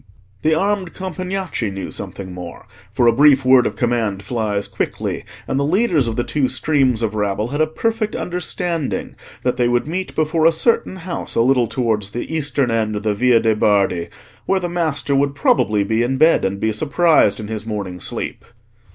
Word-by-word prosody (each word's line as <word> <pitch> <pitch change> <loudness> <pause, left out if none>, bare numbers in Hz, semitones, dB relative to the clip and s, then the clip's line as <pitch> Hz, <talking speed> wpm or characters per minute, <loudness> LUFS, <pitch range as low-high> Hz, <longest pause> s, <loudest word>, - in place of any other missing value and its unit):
The 155 0 +2
armed 195 +1 -1
Compagnacci 185 - -3
knew 95 0 -6
something 95 -2 -6
more, 90 -2 -9 0.3
for 120 +3 +1
a 115 - +5
brief 140 +1 +5
word 130 -1 +6
of - - -5
command 115 -5 -1
flies 105 -2 -2
quickly, - - -3 0.2
and 135 - 0
the - - +1
leaders 165 - +2
of 115 - -2
the 120 - 0
two 135 -1 0
streams 130 -3 +1
of 110 -1 -1
rabble 105 +1 -1
had 145 +3 -1
a 155 - +3
perfect 220 +6 -2
understanding 175 -3 -3 0.3
that 125 - 0
they 120 - +2
would 120 +2 +1
meet 185 +4 -4
before 155 +1 +2
a - - +5
certain 185 +3 +1
house 180 -1 -5
a - - +3
little 125 -1 +3
towards 110 -5 -1
the 120 +8 -5
eastern 140 -5 0
end 110 -2 0
of 105 - -4
the 110 -1 +1
Via 120 +2 +4
de' 110 -1 +2
Bardi, 100 -5 +2 0.4
where 195 - +2
the 175 - -3
master 160 -5 -1
would 140 +1 +1
probably 110 -7 +2
be 110 +3 0
in 130 +2 0
bed, 160 +4 +4
and 95 +1 -2
be 110 - 0
surprised 150 - +3
in 105 - -6
his 110 0 -5
morning 100 -5 -4
sleep. - - -5
125 Hz, 195 wpm, -19 LUFS, 110-160 Hz, 0.4 s, word